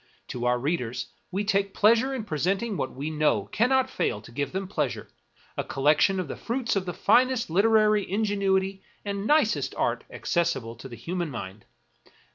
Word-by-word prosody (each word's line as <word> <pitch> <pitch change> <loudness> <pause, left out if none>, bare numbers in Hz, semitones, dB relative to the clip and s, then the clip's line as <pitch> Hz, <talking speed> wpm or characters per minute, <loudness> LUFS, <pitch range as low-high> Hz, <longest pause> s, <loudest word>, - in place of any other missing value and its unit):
To 125 -1 -4
our 125 0 +3
readers 125 -3 -2 0.2
we 195 +3 -2
take 200 -1 0
pleasure 230 +5 +4
in 245 - -3
presenting 195 - -1
what 130 - -2
we 145 +4 -4
know 150 -10 +1
cannot 260 +3 +3
fail 105 - -1
to - - -13
give 140 +3 -3
them 190 0 -3
pleasure 150 -9 -2 0.3
— - - -31
a - - +1
collec 145 +2 +2
tion 195 -1 +3
of 180 - -3
the - - -5
fruits 235 -1 -2
of 190 -2 -1
the - - -1
finest 255 -6 +3
literary 215 +2 +3
ingenuity 195 -2 0 0.2
and 200 +1 -3
nicest 305 +1 +2
art - - 0
accessible 135 -10 -1
to 135 +2 -10
the 120 - -8
human 175 +7 -3
mind. 100 -5 -7
190 Hz, 180 wpm, -26 LUFS, 145-210 Hz, 0.3 s, pleasure